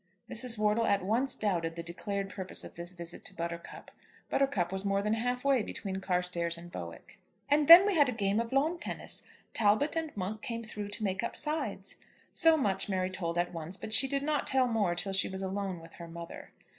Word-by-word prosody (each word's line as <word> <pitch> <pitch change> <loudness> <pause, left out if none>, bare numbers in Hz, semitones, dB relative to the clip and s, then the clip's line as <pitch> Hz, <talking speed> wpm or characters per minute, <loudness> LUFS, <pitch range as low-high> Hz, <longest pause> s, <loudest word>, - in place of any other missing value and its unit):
Mrs. 235 0 -1
Wortle 215 +2 +2
at 200 -2 +2
once 240 +7 +1
doubted 170 -6 -1
the 170 - -5
declared 195 +3 -4
purpose 190 -2 -3
of - - -10
this 170 +1 -7
visit 175 -1 -5
to 195 - -9
Buttercup. 170 0 -6 0.4
Buttercup 205 -11 +1
was 190 0 -2
more 200 0 +1
than 210 +1 +1
half 245 +3 -1
way 275 -3 +4
between 195 -2 -4
Carstairs 180 -2 -1
and 175 +1 -11
Bowick. 85 - -9 0.3
"And 290 0 +3
then 345 +3 +12
we 410 - +2
had 290 -6 +4
a - - +1
game 205 -2 0
of 230 0 -2
lawn 305 +6 +1
tennis. - - -2 0.3
Talbot 220 +9 +2
and 325 -1 -1
Monk 205 +3 -3
came 230 0 -4
through 210 -2 -5
to 205 +2 -4
make 190 -2 0
up 235 - -3
sides." 285 -11 -3 0.4
So 325 -1 +5
much 205 -7 0
Mary 185 -1 0
told 170 -2 -3
at 175 +1 0
once, 165 +3 -5
but 215 - -6
she 255 +5 +5
did 275 +1 -1
not 300 0 0
tell 265 -1 +4
more 210 -7 +1
till 195 +2 -2
she 195 - +3
was 190 0 -5
alone 190 -1 -3
with 165 0 -14
her 170 - -9
mother. 170 0 -9
200 Hz, 215 wpm, -31 LUFS, 180-245 Hz, 0.4 s, then